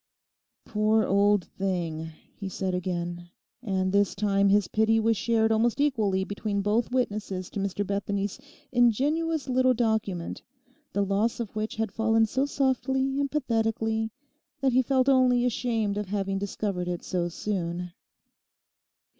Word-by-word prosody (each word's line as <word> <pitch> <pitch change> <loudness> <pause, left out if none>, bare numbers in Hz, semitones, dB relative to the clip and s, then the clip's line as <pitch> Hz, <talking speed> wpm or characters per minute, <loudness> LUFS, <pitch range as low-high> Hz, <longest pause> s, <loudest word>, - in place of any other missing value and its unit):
'Poor 215 0 +2
old 200 -1 +3
thing!' 170 -5 -3 0.3
he 195 -2 -6
said 190 0 -2
again; 175 -1 -3 0.3
and 190 -5 -1
this 200 0 +2
time 200 0 +2
his 205 -1 +3
pity 220 +1 +2
was 225 +1 +2
shared 225 +2 +2
almost 230 +3 +2
equally 215 -10 +1
between 205 +1 -3
both 215 +3 +1
witnesses 205 -7 -2
to - - -4
Mr 200 +1 -2
Bethany's 200 +2 -2 0.3
ingenuous 285 +6 +2
little 255 0 +3
document, 220 -7 -1 0.5
the 200 0 0
loss 205 +5 0
of 220 -3 -5
which 215 0 -3
had 225 -2 -2
fallen 225 0 +3
so 260 +6 0
softly 265 0 0
and 280 -1 0
pathetically 225 -5 0 0.5
that 265 -2 +1
he 260 - +5
felt 260 0 +1
only 255 -2 +4
ashamed 225 -4 0
of 210 - -4
having 195 -1 -1
discovered 195 -2 -3
it 175 -1 -3
so 175 -2 -1
soon. 180 -2 -3
215 Hz, 140 wpm, -27 LUFS, 195-240 Hz, 0.5 s, he